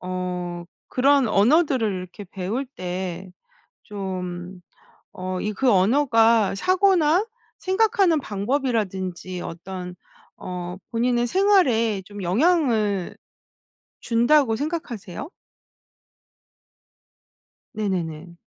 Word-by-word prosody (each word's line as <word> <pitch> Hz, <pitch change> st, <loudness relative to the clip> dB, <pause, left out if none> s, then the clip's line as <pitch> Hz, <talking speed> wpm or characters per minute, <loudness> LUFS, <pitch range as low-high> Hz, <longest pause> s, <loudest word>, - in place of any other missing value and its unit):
어 180 Hz, -1 st, -4 dB, 0.2 s
그런 275 Hz, +1 st, +3 dB
언어들을 245 Hz, -, +3 dB
이렇게 185 Hz, +2 st, -7 dB
배울 205 Hz, +8 st, -3 dB
때 185 Hz, -4 st, -5 dB, 0.5 s
좀 185 Hz, -2 st, -6 dB, 0.5 s
어 185 Hz, 0 st, -4 dB
이 210 Hz, 0 st, -2 dB
그 260 Hz, +4 st, +1 dB
언어가 225 Hz, 0 st, +3 dB
사고나 370 Hz, -, +3 dB, 0.3 s
생각하는 385 Hz, -4 st, +2 dB
방법이라든지 200 Hz, -6 st, -2 dB
어떤 180 Hz, +1 st, -7 dB, 0.4 s
어 180 Hz, 0 st, -6 dB
본인의 240 Hz, +1 st, +1 dB
생활에 255 Hz, -, +3 dB
좀 205 Hz, -1 st, -8 dB
영향을 220 Hz, -, +1 dB, 0.9 s
준다고 240 Hz, +1 st, +3 dB
생각하세요? 285 Hz, -, -5 dB, 2.5 s
네네네. 170 Hz, -5 st, -3 dB
210 Hz, 185 characters per minute, -23 LUFS, 185-275 Hz, 2.5 s, 그런